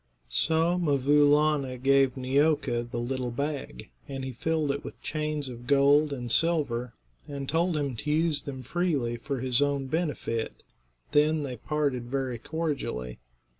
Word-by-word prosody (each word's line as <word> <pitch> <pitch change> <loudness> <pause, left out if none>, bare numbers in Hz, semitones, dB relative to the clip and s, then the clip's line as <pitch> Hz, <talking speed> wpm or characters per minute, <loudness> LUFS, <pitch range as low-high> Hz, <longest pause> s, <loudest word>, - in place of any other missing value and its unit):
So 165 - +2
'Mvoo 145 -2 +3
Laana 145 -3 +2
gave 135 0 +3
Neeoka 130 -2 +1
the 120 - -5
little 125 +1 -2
bag, 140 - -4 0.2
and 135 -1 -5
he 130 - -4
filled 155 +3 0
it 140 +1 -4
with - - -9
chains 150 -2 -2
of 120 -1 -9
gold 145 +2 +4
and 120 -4 -4
silver, 140 -7 +1 0.3
and 140 -2 -5
told 165 +2 +1
him 140 -4 -2
to 150 - -4
use 155 -1 +2
them 130 -2 -7
freely 140 -5 0
for 135 +1 -4
his 130 0 +2
own 140 -1 +1
benefit. 135 -6 -2 0.5
Then 150 +1 +3
they 130 -3 -4
parted 140 -1 -1
very 130 -3 -2
cordially. 140 - -3
140 Hz, 150 wpm, -28 LUFS, 125-150 Hz, 0.5 s, gold